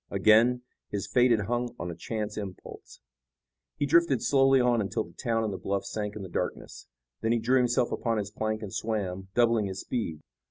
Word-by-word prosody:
Again, 110 +5 +4 0.3
his 100 0 -3
fate 125 +5 +3
had 115 -3 +3
hung 120 +3 -2
on 85 +1 -4
a - - -7
chance 105 +4 -4
impulse. 100 -3 -9 0.8
He 145 - +1
drifted 145 -4 +3
slowly 135 -1 +4
on 120 -2 +3
until 100 -3 -1
the 85 - -16
town 115 0 -1
and 105 -2 -2
the 95 - -5
bluffs 100 0 -3
sank 105 -1 -3
in 105 - -6
the - - -6
darkness. 85 - -5 0.3
Then 115 +1 +1
he - - +2
drew 125 +4 +3
himself 125 -1 +1
upon 115 -2 -1
his 105 -1 -3
plank 110 0 -2
and 100 - -7
swam, 95 -4 -3
doubling 115 -3 +3
his 95 0 -5
speed. 85 -11 -4
110 Hz, 200 wpm, -28 LUFS, 100-120 Hz, 0.8 s, Again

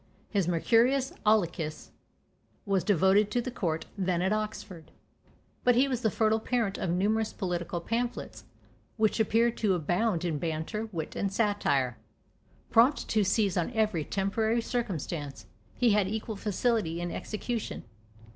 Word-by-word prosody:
His 195 -5 +1
"Mercurius 240 +10 +2
Aulicus" 170 -7 +1 0.7
was 195 -4 +1
devoted 195 +2 +4
to 245 - 0
the 245 +1 -3
court, 165 -9 -2
then 180 -3 0
at 190 +2 +2
Oxford. 210 -6 -5 0.7
But 245 -1 +4
he 260 +3 +4
was 250 -3 -2
the 220 - +2
fertile 220 +1 +2
parent 225 -3 -1
of 185 - -2
numerous 210 +5 +1
political 175 -3 -3
pamphlets, 235 +7 -3 0.5
which 220 0 +2
appear 225 +2 +3
to 210 -4 +1
abound 180 +3 0
in 160 -4 -1
banter, 165 +8 -3
wit, 160 -5 -5
and 195 - -1
satire. 195 - +1 0.7
Prompt 245 +6 +4
to 215 -1 +3
seize 200 -1 +1
on 175 - 0
every 215 -8 +1
temporary 220 +6 0
circumstance, 160 - -4 0.3
he 245 -2 +3
had 205 -2 +3
equal 220 +2 -4
facility 205 -4 0
in 175 0 -3
execution. 225 +1 -4
205 Hz, 140 wpm, -29 LUFS, 175-225 Hz, 0.7 s, devoted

